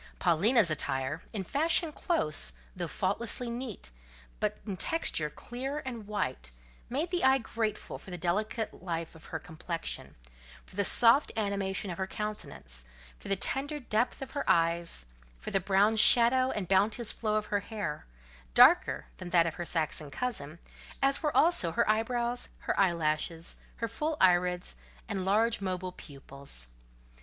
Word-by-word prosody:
Paulina's 190 +3 +4
attire—in 155 - -3
fashion 320 - +1
close, 300 - 0 0.2
though 175 -2 -3
faultlessly 225 +7 -1
neat, 235 - -5 0.5
but - - -1
in 200 - -3
texture 180 - 0
clear 265 - -5
and 235 -5 -6
white—made 130 - -4
the 355 -1 0
eye 265 +1 +6
grateful 225 -3 -3
for - - -13
the 180 - -5
delicate 210 +6 -2
life 165 -2 -4
of 160 - -15
her 160 - -4
complexion, 165 +1 -5 0.5
for - - -15
the 200 - +2
soft 235 +7 +5
animation 200 -2 -1
of 175 - -7
her 190 - -1
countenance, 210 - -5 0.4
for - - -11
the 195 - +2
tender 275 +9 -1
depth 240 +1 -1
of 265 - -9
her 285 -1 -2
eyes, 170 - +2 0.3
for - - -6
the 195 - +2
brown 200 +3 +3
shadow 245 +3 +6
and 205 -7 -3
bounteous 205 +5 +3
flow 215 -2 -1
of 215 0 0
her 205 - +3
hair—darker - - +2
than 185 - -7
that 170 -2 +4
of 165 - -1
her 175 - -5
Saxon 155 -3 -2
cousin, 170 - -4 0.4
as 275 0 +2
were 300 -2 0
also 300 - +5
her - - +2
eyebrows, 235 +3 0
her - - -1
eyelashes, 165 -2 0 0.2
her 230 - -2
full 300 +7 -2
irids, 180 0 +3 0.3
and 195 -3 -3
large 220 +3 +2
mobile 185 -1 -3
pupils. 140 - -7
195 Hz, 150 wpm, -30 LUFS, 165-235 Hz, 0.5 s, eye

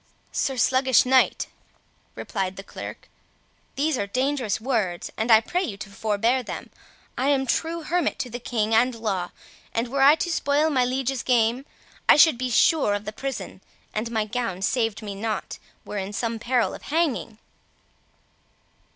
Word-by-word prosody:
"Sir 265 -1 -1
Sluggish 260 +1 +4
Knight," 260 0 +3 0.7
replied 190 -1 -3
the 195 - -8
Clerk, - - -9 0.7
"these 290 0 0
are 200 - -1
dangerous 255 -1 -1
words, 215 -8 -1
and 220 +2 -2
I 220 -1 +8
pray 350 +10 -1
you 215 - -4
to 200 0 -9
forbear 220 +5 +1
them. 235 - -7 0.5
I 260 - +1
am 275 -2 +2
true 325 +6 -1
hermit 345 +3 0
to 250 - -4
the 245 - -5
king 225 -2 -1
and 240 +2 +3
law, 195 -6 -2 0.5
and 230 +1 0
were 275 +2 -1
I 280 +3 +8
to 345 +2 -2
spoil 300 -1 +2
my 255 -3 +3
liege's 260 0 -1
game, 245 +2 +1 0.4
I - - +9
should 295 -4 +6
be 255 0 -1
sure 245 -2 +3
of 205 +1 -5
the 210 - -5
prison, 270 +4 -5 0.3
and, 215 +2 -2
an 235 - -8
my 215 -1 +1
gown 210 -5 -3
saved 225 -1 0
me 205 -1 -5
not, 215 +2 -4 0.3
were 205 - -4
in 195 +2 -5
some 230 +1 -2
peril 245 +1 +1
of - - -9
hanging." 290 -8 -1
240 Hz, 170 wpm, -24 LUFS, 215-270 Hz, 0.7 s, I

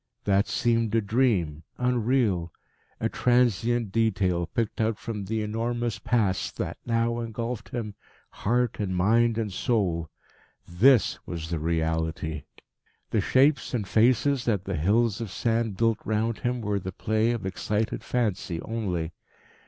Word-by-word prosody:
That 100 +1 +2
seemed 115 -2 +1
a - - +5
dream, 100 - +1 0.2
unreal, 120 -8 +1 0.5
a - - +1
transient 120 -2 +2
detail 95 -6 +1
picked 110 +6 -2
out 110 -1 +1
from 105 -1 -5
the 110 +2 -1
enormous 115 0 -2
Past 100 -4 0
that - - -4
now 115 0 +1
engulfed 115 0 -4
him, 110 -4 -4 0.4
heart 120 +2 0
and 95 -3 -1
mind 115 +5 +3
and 110 -4 -2
soul. 90 - 0 0.6
This 115 +7 +4
was 85 -3 -5
the 85 - -1
reality. 80 -1 -1 0.7
The 110 - +2
shapes 130 +4 +3
and 105 -5 -2
faces 125 +5 +3
that 105 -6 +1
the 100 - -2
hills 105 +7 +2
of 115 - -4
sand 115 0 -1
built 115 0 +2
round 110 +1 -1
him 125 0 -1
were 105 -2 -1
the 95 0 -5
play 110 +4 0
of 120 -4 -2
excited 105 +3 -2
fancy 100 -8 -1
only. 90 -8 -2
110 Hz, 140 wpm, -26 LUFS, 95-120 Hz, 0.7 s, a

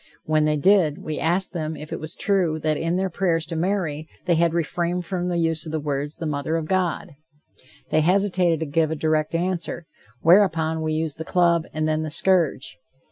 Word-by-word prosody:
When 155 -1 +2
they 150 0 +1
did, 175 -2 +3
we 155 -1 -4
asked 180 +3 +1
them 160 -2 -3
if 150 - -8
it - - -4
was 155 - -5
true 185 -6 +1
that 155 0 +1
in 165 +3 -1
their 190 0 -1
prayers 165 -3 0
to 165 - -5
Mary 165 -4 -1 0.2
they 175 - +3
had 170 0 +3
refrained 170 +2 -1
from 180 -1 -2
the 175 -1 -1
use 165 -1 0
of - - -5
the 160 - -1
words, 145 0 -3
"The 165 - -5
mother 150 +1 -2
of 165 -1 -1
God." 185 -2 -1 0.8
They 155 - +3
hesitated 180 -2 +2
to - - 0
give 155 +2 +1
a 160 - -2
direct 155 +1 0
answer, 175 -1 -2 0.4
whereupon 165 -3 +3
we 155 0 -1
used 155 -1 -2
the - - -3
club, 170 -1 +2
and 155 0 -1
then, 155 0 0
the 155 - -3
scourge. 155 - +1
165 Hz, 205 wpm, -23 LUFS, 155-175 Hz, 0.8 s, did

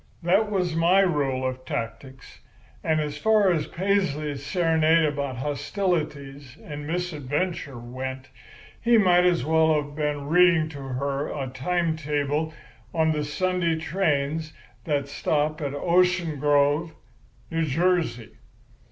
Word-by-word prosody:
That 195 +5 +3
was 180 -5 -1
my 175 +4 +4
rule 140 -8 0
of 130 0 -5
tactics; 130 +2 -6 0.4
and 155 -1 +1
as 150 -1 -3
far 210 +1 +4
as 160 -3 0
Paisley's 155 -7 -1
serenade 160 0 +3
about 140 -3 -2
hostilities 145 - -3
and 145 -1 -7
misadventure 160 -3 -3
went, 130 +2 -6 0.5
he 235 0 +4
might 180 -4 +5
as 175 -7 +1
well 160 0 +3
have 145 -1 -2
been 150 -2 -2
reading 170 0 +4
to 145 -3 -9
her 135 +2 -2
a 135 -3 -4
time 170 +4 0
table 150 +1 -1 0.4
of 160 -1 +3
the 150 -1 -1
Sunday 170 +2 0
trains 160 -2 -1 0.3
that 145 -3 0
stop 150 +2 -1
at 140 -1 -3
Ocean 175 -1 +2
Grove, 145 +3 +2 0.6
New 165 0 0
Jersey. 165 -6 0
155 Hz, 125 wpm, -25 LUFS, 140-175 Hz, 0.6 s, might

